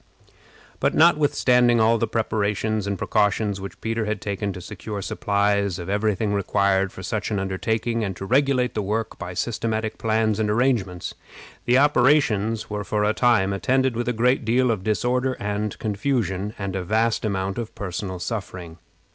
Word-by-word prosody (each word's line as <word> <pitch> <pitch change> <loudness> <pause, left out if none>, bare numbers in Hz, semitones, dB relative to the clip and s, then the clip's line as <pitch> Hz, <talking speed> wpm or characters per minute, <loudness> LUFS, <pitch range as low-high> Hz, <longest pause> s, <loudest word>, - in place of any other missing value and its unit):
But, - - +1
notwithstanding 125 -7 +4
all 115 +1 +4
the - - 0
precautions 105 -1 0
which 100 - -8
Peter 115 0 -1
had 105 -1 -2
taken 100 0 -3
to 90 - -7
secure 105 +3 -7
supplies 100 -1 0
of 85 0 -7
every 105 +1 +1
thing 105 +1 -1
required 100 -1 +1
for 95 - -10
such 105 +3 -2
an 105 - -1
undertaking, 110 +4 -1
and 95 -3 -3
to 95 - -6
regulate 130 +1 +2
the 105 - -1
work 110 +3 -3
by 90 -2 -6
systematic 110 +2 -2
plans 110 -1 +1
and 110 -1 +1
arrangements, 105 -6 0 0.5
the 125 +1 +4
operations 125 -7 +3
were 105 -1 -4
for 105 0 -1
a 105 +1 +2
time 110 -5 +3
attended 130 +4 +1
with 120 +1 -2
a - - +2
great 125 +3 +2
deal 120 +2 +2
of 100 -5 -2
disorder 125 +5 0
and 105 0 -3
confusion, 105 -2 -2
and 100 -2 -4
a 95 - -2
vast 110 +4 +1
amount 95 -1 -2
of 115 -2 -6
personal 95 -1 -4
suffering. 90 -5 -6
105 Hz, 165 wpm, -23 LUFS, 100-115 Hz, 0.5 s, notwithstanding